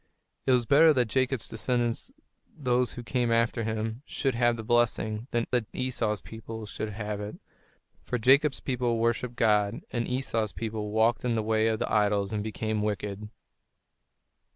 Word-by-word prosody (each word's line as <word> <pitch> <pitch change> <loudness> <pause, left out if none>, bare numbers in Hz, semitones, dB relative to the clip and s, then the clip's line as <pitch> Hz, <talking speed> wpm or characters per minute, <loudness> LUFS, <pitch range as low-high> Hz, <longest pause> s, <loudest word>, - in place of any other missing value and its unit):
It - - +5
was 125 -2 +3
better 155 +5 +6
that 125 -3 +2
Jacob's 130 -2 0
descendants, 120 +1 -1 0.5
those 125 -4 +1
who 120 - -7
came 120 -1 0
after 115 0 +2
him, 110 +2 -3
should 135 -2 -1
have 120 0 +2
the 110 - -5
blessing, 110 -1 +1
than 120 -1 0
that 120 -4 +1
Esau's 115 -6 -1
people 110 0 -8
should 110 +1 -5
have 105 0 -4
it; 105 +1 -6 0.7
for 125 - -2
Jacob's 135 +4 +4
people 125 -3 0
worshipped 115 +1 0
God, 105 -3 +2
and 120 -2 -1
Esau's 115 -5 -1
people 110 -2 -4
walked 110 +2 +2
in 120 -2 +1
the 110 - 0
way 110 0 +2
of 110 -1 +1
the - - -2
idols 105 -1 +2
and 105 - -1
became 110 0 -2
wicked. 105 0 -3
115 Hz, 165 wpm, -28 LUFS, 110-125 Hz, 0.7 s, better